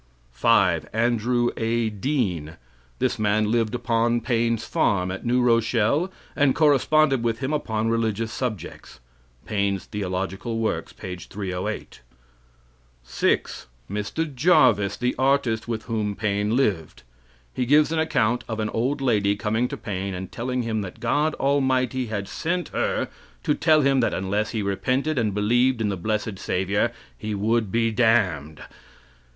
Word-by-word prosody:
5. 90 - +2
Andrew 120 +1 +1
A. 115 0 0
Dean. 100 - -2 0.4
This - - 0
man 105 0 +2
lived 115 0 +1
upon 120 0 +1
Paine's 115 -2 0
farm, 95 -4 +1
at 95 - -6
New 125 +1 +2
Rochelle, 115 - +2 0.2
and 140 -3 +3
corresponded 150 -2 +3
with 115 -1 0
him 130 +4 -2
upon 110 -7 -1
religious 115 -1 0
subjects. 110 - -5 0.5
Paine's 100 -2 -1
Theological 95 +3 -3
Works, 115 -1 -2
page 90 -1 -8
308. 95 -3 -5 1.0
6. 65 +1 -1 0.2
Mr. 110 +10 -3
Jarvis, 125 - +4
the 125 0 0
artist 130 -5 +1
with 110 -2 -3
whom 105 -3 -2
Paine 105 +1 0
lived. 85 - -1 0.5
He 125 - -2
gives 150 +3 +4
an 165 - 0
account 120 -6 +1
of 110 -1 -3
an 110 -1 -1
old 130 +6 -1
lady 105 -6 +2
coming 110 +3 0
to - - -6
Paine, 95 -2 -4
and 95 0 -6
telling 125 +1 -2
him 110 -2 -1
that 95 -3 -8
God 150 +1 +1
Almighty 130 -2 +1
had 100 -3 -4
sent 175 +2 -2
her - - -1 0.4
to - - +2
tell 155 0 +4
him 135 -1 +3
that 115 - +1
unless 100 +3 -1
he 110 -3 -2
repented 130 +9 0
and 105 -4 0
believed 120 +4 +2
in 110 -2 0
the 100 - -1
blessed 105 +1 -2
savior 100 +5 0 0.2
he 105 -1 -4
would 110 0 0
be 115 +1 +1
damned. 105 -10 +1
115 Hz, 145 wpm, -24 LUFS, 100-125 Hz, 1.0 s, Jarvis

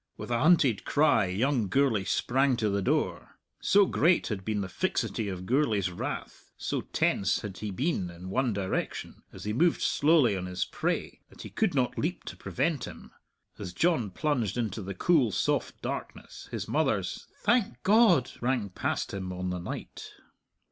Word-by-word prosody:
With - - -7
a 120 - +2
hunted 140 - +4
cry 145 -9 +3
young 115 +4 +1
Gourlay 120 -4 +2
sprang 130 +4 +1
to 110 -3 0
the 100 0 0
door. - - -1 0.2
So 200 0 +5
great 175 -1 +2
had 100 -4 -3
been 105 0 -1
the 95 - -3
fixity 100 +3 -1
of 90 -1 -5
Gourlay's 110 - +1
wrath, 85 - -6
so - - -2
tense 95 -3 0
had 95 -3 -7
he 105 - -4
been 100 - -1
in 90 +2 -9
one 130 +2 +1
direction, 100 -2 -3
as - - -10
he 105 - -2
moved 165 +8 +2
slowly 145 -8 +4
on 90 -1 -4
his 90 0 -2
prey, - - -3
that - - -12
he - - -9
could 205 -8 0
not 125 -2 0
leap 170 +3 -2
to - - -7
prevent 155 -6 -1
him. 80 -2 -11 0.5
As 90 - -6
John 145 - +1
plunged 125 - -1
into 110 -3 -2
the 95 0 -6
cool, 145 -11 +3
soft - - -1
darkness, - - -6
his - - -4
mother's - - -1
"Thank 205 - +1
God!" 195 - +5
rang 120 -4 0
past 90 - -2
him 95 -2 -4
on 90 0 -3
the 90 - -3
night. 85 - -7
115 Hz, 175 wpm, -29 LUFS, 95-145 Hz, 0.5 s, So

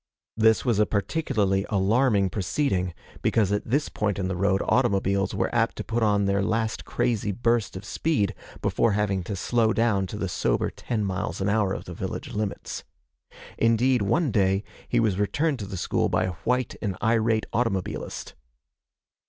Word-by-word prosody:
This 110 +2 +3
was 115 -5 +2
a 105 - +4
particularly 100 -3 0
alarming 100 0 +2
proceeding, 95 - -1 0.3
because 105 -4 +2
at 105 +2 -1
this 145 +5 +1
point 105 -2 -1
in 95 -2 -1
the 95 - -2
road 95 +1 +1
automobiles 100 -5 +2
were - - -1
apt - - +2
to - - -5
put 115 +1 -2
on 105 -2 +3
their 100 0 +1
last 110 +2 -1
crazy 110 -4 0
burst 115 -1 0
of 100 - -9
speed, 120 -4 0 0.3
before 115 - +2
having 100 -2 0
to 100 - -3
slow 115 +4 +1
down 105 -5 +1
to 105 - -6
the 100 - -2
sober 90 - 0
ten 110 -4 -3
miles 95 -2 -3
an 95 +1 0
hour 105 -2 +2
of - - -4
the - - -7
village - - -5
limits. 105 -1 -4 0.8
Indeed, 115 +2 +3
one 140 - +1
day, 95 -1 +2 0.2
he 120 - +1
was 105 -4 +1
returned 140 - 0
to 100 - -5
the 95 - -5
school 85 - 0
by - - +1
a 90 0 -2
white 125 0 +1
and 100 -4 -2
irate 110 -1 +2
automobilist. 115 -6 -2
105 Hz, 175 wpm, -26 LUFS, 95-115 Hz, 0.8 s, a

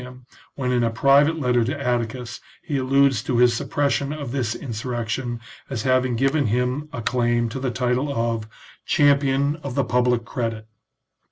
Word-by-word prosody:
him 125 0 -12 0.3
when 130 -2 -2
in 120 -1 +2
a 115 - +2
private 140 +7 +3
letter 125 -4 +2
to 135 +5 -3
Atticus 120 -2 -2 0.2
he 145 - -2
alludes 135 -2 +3
to 120 +1 -1
his 120 0 +5
suppression 140 +3 -1
of 145 -5 -5
this 120 -4 -1
insurrection 120 0 -4 0.3
as 125 -5 -3
having 130 -1 +2
given 135 +3 +1
him 125 +6 -1
a 120 - -6
claim 120 -1 +1
to 125 - -5
the 130 0 -1
title 125 +3 0
of 115 -3 -1 0.4
champion 140 0 +2
of 140 -5 -7
the 140 - +2
public 125 -2 +1
credit." 115 -3 -4
125 Hz, 165 wpm, -23 LUFS, 120-140 Hz, 0.4 s, his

